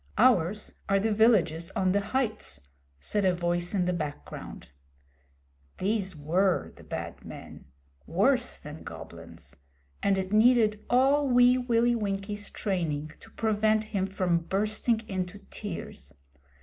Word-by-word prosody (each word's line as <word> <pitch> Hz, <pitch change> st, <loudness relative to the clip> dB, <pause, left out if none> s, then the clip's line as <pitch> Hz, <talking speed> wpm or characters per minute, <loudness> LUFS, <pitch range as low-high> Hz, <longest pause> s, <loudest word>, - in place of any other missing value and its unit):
Ours 210 Hz, -4 st, +2 dB
are 195 Hz, 0 st, +4 dB
the 220 Hz, +3 st, 0 dB
villages 185 Hz, -7 st, +3 dB
on 185 Hz, -1 st, +2 dB
the 200 Hz, -, +3 dB
heights,' 215 Hz, -, -2 dB, 0.4 s
said 205 Hz, -, -1 dB
a 185 Hz, -1 st, +3 dB
voice 175 Hz, +2 st, 0 dB
in 180 Hz, -2 st, +2 dB
the 180 Hz, -, 0 dB
background. 150 Hz, -, -6 dB, 1.1 s
These 195 Hz, -2 st, -1 dB
were 175 Hz, +5 st, +1 dB
the -, -, -15 dB
Bad -, -, -6 dB
Men -, -, -10 dB, 0.4 s
worse -, -, +2 dB
than -, -, -10 dB
Goblins -, -, -10 dB, 0.5 s
and 195 Hz, -1 st, +2 dB
it 190 Hz, +1 st, -3 dB
needed 215 Hz, -1 st, +4 dB
all 275 Hz, +4 st, +4 dB
Wee 245 Hz, 0 st, +5 dB
Willie 240 Hz, -1 st, +2 dB
Winkie's 205 Hz, -1 st, -3 dB
training 155 Hz, -7 st, -2 dB
to -, -, -15 dB
prevent 215 Hz, 0 st, +1 dB
him 195 Hz, -1 st, +1 dB
from 185 Hz, -3 st, +1 dB
bursting 215 Hz, +5 st, 0 dB
into 185 Hz, 0 st, -3 dB
tears. 165 Hz, -, -7 dB
200 Hz, 130 wpm, -28 LUFS, 180-220 Hz, 1.1 s, Wee